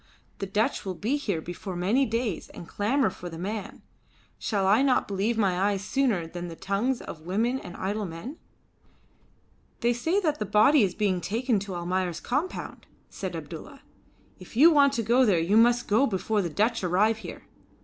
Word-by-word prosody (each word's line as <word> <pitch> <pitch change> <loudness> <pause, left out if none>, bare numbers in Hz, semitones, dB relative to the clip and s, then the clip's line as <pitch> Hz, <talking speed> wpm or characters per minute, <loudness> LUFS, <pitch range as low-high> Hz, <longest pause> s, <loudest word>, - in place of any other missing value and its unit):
The 195 - -3
Dutch 215 +7 0
will 190 -2 -4
be 225 +10 -1
here 205 - -2
before 175 +3 -7
many 215 +10 +2
days 230 -4 -2
and 170 - -9
clamour 225 +2 +1
for 180 - -8
the 165 - -8
man. 205 +4 -5 0.6
Shall 200 -3 -1
I 205 +6 +4
not 270 -2 +2
believe 205 +4 -1
my 190 -4 +1
eyes 200 -1 -2
sooner 240 -11 +1
than 175 +2 -6
the 165 - -8
tongues 200 +8 -1
of 155 - -8
women 230 +8 0
and 180 - -10
idle 205 +2 -2
men?" 175 - -8 1.4
"They 240 +1 +3
say 320 +12 0
that 305 -5 0
the 210 - -1
body 215 +8 +5
is 195 -4 +1
being 195 -4 0
taken 225 +5 0
to 195 -1 -6
Almayer's 175 0 -2
compound," 295 +9 -4 0.2
said - - -5
Abdulla. - - -9 0.6
"If - - -12
you 320 +6 +8
want 280 -3 +5
to 230 - -1
go 240 +4 +4
there 205 -8 +3
you 170 +5 +1
must 240 +2 +4
go 225 +7 +3
before 210 +1 0
the 175 - -2
Dutch 215 +7 0
arrive 205 +5 +2
here. 220 - -9
210 Hz, 185 wpm, -27 LUFS, 185-240 Hz, 1.4 s, you